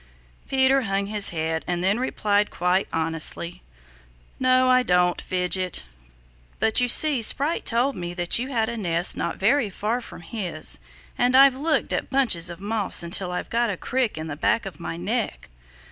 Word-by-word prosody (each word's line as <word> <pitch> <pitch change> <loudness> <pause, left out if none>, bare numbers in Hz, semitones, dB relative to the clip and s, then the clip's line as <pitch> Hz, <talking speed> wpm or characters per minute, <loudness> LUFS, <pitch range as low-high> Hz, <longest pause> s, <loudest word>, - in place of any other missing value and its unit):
Peter 265 0 +3
hung 200 -3 -2
his 205 0 0
head 160 -1 -3
and 175 0 -2
then 200 +5 +1
replied 210 -5 0
quite 180 +2 0
honestly, 165 +1 -1 0.8
"No 255 0 +3
I 255 0 +4
don't, 180 -5 +1
Fidget. 180 0 -2 0.8
But 220 +2 +3
you 245 - +2
see 280 +1 +5
Sprite 285 +8 +2
told 245 +3 +1
me 175 -1 -6
that 175 +4 +1
you 250 - -3
had 230 -5 -1
a 235 0 -5
nest 175 -4 +2
not - - -4
very 230 +3 +1
far 220 +5 -3
from 200 - -11
his 170 - -2 0.4
and 250 +1 +3
I've 275 0 +7
looked 300 +2 0
at - - -3
bunches 230 -11 +2
of 170 0 -9
moss 205 -2 +1
until 180 +2 -2
I've 180 - -5
got 235 0 +1
a 195 - -3
crick 250 -4 -2
in 155 - -5
the 150 -2 -6
back 205 +8 0
of 185 -6 -9
my 85 0 -6
neck." 85 -6 -4
205 Hz, 175 wpm, -23 LUFS, 175-250 Hz, 0.8 s, I've